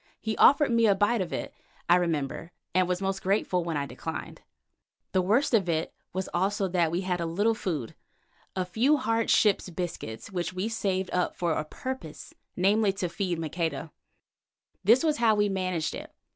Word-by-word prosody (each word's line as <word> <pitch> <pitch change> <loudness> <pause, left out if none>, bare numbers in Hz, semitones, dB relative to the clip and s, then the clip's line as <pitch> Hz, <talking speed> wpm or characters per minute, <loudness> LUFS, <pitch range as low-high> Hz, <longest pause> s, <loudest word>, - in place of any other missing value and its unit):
He 220 0 -2
offered 285 -1 +6
me 230 -1 +4
a 200 - +4
bite 205 +3 +2
of 175 -2 -3
it, - - -4 0.3
I 175 - +6
remember, 165 -1 -1 0.2
and 185 0 +3
was 180 +1 -1
most 195 0 -1
grateful 190 -2 +1
when 165 -2 -2
I 140 - -1
declined. - - -6 0.7
The 185 - +2
worst 225 +10 +2
of 195 -6 +3
it 160 0 -1 0.2
was 190 +1 -3
also 195 +2 +1
that 175 -2 +2
we 170 +3 -1
had 180 -2 -1
a 170 - -1
little 205 +7 +2
food, 160 - -3 0.6
a 185 -1 0
few 240 +11 +2
hard 230 -3 0
ship's 205 -3 +3
biscuits, 170 - -5
which 175 -2 -3
we 185 +1 -3
had 225 - -2
saved 190 -4 -1
up 180 0 0
for 175 -2 0
a 155 - -1
purpose, 170 0 -7 0.2
namely, 200 +3 +3
to 190 -3 -3
feed 180 0 -2
Maqueda. 165 0 -3 0.9
This 230 - +5
was 305 -2 +2
how 225 -2 +4
we 205 0 +2
managed 185 -4 -1
it. - - -8
185 Hz, 185 wpm, -28 LUFS, 170-210 Hz, 0.9 s, offered